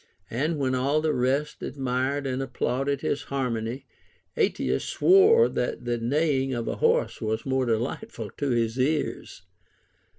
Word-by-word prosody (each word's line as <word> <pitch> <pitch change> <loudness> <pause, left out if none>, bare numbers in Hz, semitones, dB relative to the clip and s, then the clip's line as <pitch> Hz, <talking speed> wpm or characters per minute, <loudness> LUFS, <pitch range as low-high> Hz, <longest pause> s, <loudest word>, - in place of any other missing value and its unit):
And 150 +7 -1
when 130 -2 0
all 135 +4 +1
the 155 0 0
rest 135 +4 0
admired 135 +1 -2
and 130 0 -2
applauded 135 +2 -1
his 145 - -1
harmony, 125 -2 -2 0.5
Ateas - - 0
swore 425 +5 +5
that 125 0 -3
the 120 -1 -1
neighing 135 +1 +1
of 120 -1 -3
ahorse 470 - +1
was 110 0 -2
more 130 -1 0
delightful 120 - -3
to 145 - -3
his 115 0 0
ears. 145 +3 -1
135 Hz, 135 wpm, -26 LUFS, 125-145 Hz, 0.5 s, swore